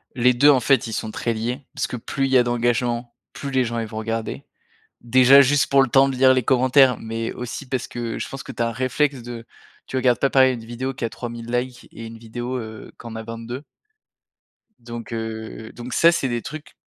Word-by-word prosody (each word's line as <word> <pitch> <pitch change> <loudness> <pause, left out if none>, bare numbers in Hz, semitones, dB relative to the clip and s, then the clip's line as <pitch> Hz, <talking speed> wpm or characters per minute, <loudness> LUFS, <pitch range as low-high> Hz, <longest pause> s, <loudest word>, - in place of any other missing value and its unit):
Les 125 0 +4
2 145 +5 +5
en 135 -3 +6
fait, 130 -4 +3
ils 110 - -5
sont 110 - -3
très 115 +1 -2
liés, 120 +5 -4
parce - - -1
que 125 - -5
plus 135 +4 -2
il - - -4
y 130 - +6
a 125 - +5
d'engagement, 120 0 0 0.2
plus 140 - -6
les 130 -2 +2
gens, 115 0 -3
ils 115 - -3
vont 110 - -8
regarder. 115 +4 -4 0.6
Déjà, 130 +3 +7
juste 140 +1 +3
pour 140 0 +5
le - - 0
temps 135 +2 +5
de 130 - -3
lire 130 0 +6
les 130 -2 +1
commentaires, 130 0 +4
mais 115 0 -4
aussi 125 +3 -6
parce 130 -2 -2
que 120 -1 -4
je - - -4
pense 135 - -7
que - - -8
tu - - -5
as - - +1
un 115 - -2
réflexe 130 +2 0
de 120 -1 -8 0.4
tu - - -6
regardes 125 -2 +2
pas 140 - +2
pareil 130 -1 +5
une 115 -1 -9
vidéo 130 +3 -4
qui 125 - -3
a - - -2
3000 120 -1 -7
likes 125 +1 -3
et 115 - -9
une 115 0 -10
vidéo, 120 +3 -5
heu, 110 -2 -9
qui - - -10
en 115 - -8
a 110 - -5
22. 115 +4 -7 1.2
Donc 120 -1 -8
heu, 110 0 -6
donc 120 +1 -7
ça 170 - +6
c'est 145 -5 0
des 120 -1 -2
trucs 155 +4 -9
120 Hz, 240 wpm, -22 LUFS, 115-130 Hz, 1.2 s, Déjà